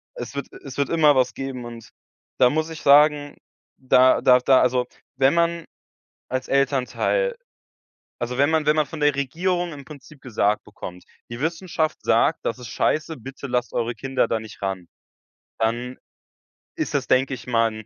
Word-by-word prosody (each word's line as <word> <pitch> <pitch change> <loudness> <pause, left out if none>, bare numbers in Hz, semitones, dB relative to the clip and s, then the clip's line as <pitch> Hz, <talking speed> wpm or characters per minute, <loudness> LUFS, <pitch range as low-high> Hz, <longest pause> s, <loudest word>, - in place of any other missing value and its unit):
Es - - -7
wird - - -4 0.2
es - - -9
wird 140 -1 0
immer 155 -3 +4
was 130 -1 +2
geben. 135 -2 -6
Und 115 -1 -10 0.5
da 125 - +6
muss 155 +3 -1
ich 160 - -8
sagen, 145 0 +4 0.4
da 130 0 +4
da 125 0 +6
da 130 +1 +4
also 125 0 +2 0.3
wenn 135 +1 +4
man 170 0 0 0.6
als 130 0 -3
Elternteil 140 - 0 0.8
also 125 +1 -3
wenn 140 +2 +3
man 160 -2 +1
wenn 150 +1 +3
man 155 -2 +2
von 160 - -8
der 145 -1 +3
Regierung 175 +5 -1
im 140 -1 -10
Prinzip 150 -1 -13
gesagt 105 -4 0
bekommt: 90 -3 -10 0.3
„Die 120 +1 -7
Wissenschaft 165 0 -2
sagt, - - +2
das 115 - -2
ist 125 -2 -9
scheiße, 155 +7 -1
bitte 135 +3 -9
lasst 125 -1 -2
eure 120 0 -1
Kinder 130 +1 -1
da 115 - -1
nicht 110 -1 -12
ran". 95 -3 -4 0.7
Dann 120 +3 -2 0.8
ist - - -3
das, - - 0
denke 130 +1 +2
ich 120 -1 -11
mal 115 -2 +2
135 Hz, 170 wpm, -23 LUFS, 125-155 Hz, 0.8 s, da